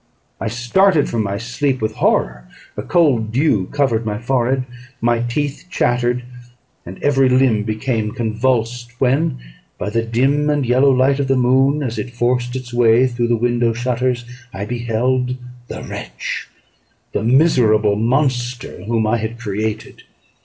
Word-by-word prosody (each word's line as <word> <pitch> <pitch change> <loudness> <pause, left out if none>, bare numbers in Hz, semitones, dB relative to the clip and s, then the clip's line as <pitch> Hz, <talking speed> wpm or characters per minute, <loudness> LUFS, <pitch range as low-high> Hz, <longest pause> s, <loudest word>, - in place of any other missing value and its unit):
I - - -3
started 145 - +2
from 115 - -1
my 100 -1 -2
sleep 130 +4 -1
with 110 - -2
horror; - - 0 0.3
a - - -4
cold 130 -11 +2
dew 115 - +1
covered 130 -6 0
my 105 -2 -3
forehead, 130 +2 0 0.4
my 120 0 +1
teeth 140 +7 -3
chattered, 125 -5 0 0.6
and 95 +2 -8
every 135 -2 +3
limb 125 -4 +3
became 110 0 -2
convulsed: 120 +1 -1
when, 135 +4 +1 0.4
by 105 - -4
the 115 +1 +1
dim 135 +6 +1
and 145 -2 +1
yellow 130 +3 +4
light 135 +1 +3
of 140 - 0
the 135 - +2
moon, 135 +4 +3
as 120 -3 -3
it 125 -1 -6
forced 125 +1 0
its 125 -2 -6
way 120 +1 +4
through 120 -2 -1
the 120 0 +2
window 120 0 +1
shutters, 120 +1 -1 0.3
I 95 +1 -5
beheld 125 +2 -1 0.3
the - - -7
wretch - - -6 0.6
the - - -1
miserable 115 -5 +3
monster 125 -2 -1
whom 115 0 0
I 115 +2 +2
had 110 +1 -4
created. 110 -1 -4
120 Hz, 150 wpm, -19 LUFS, 115-130 Hz, 0.6 s, yellow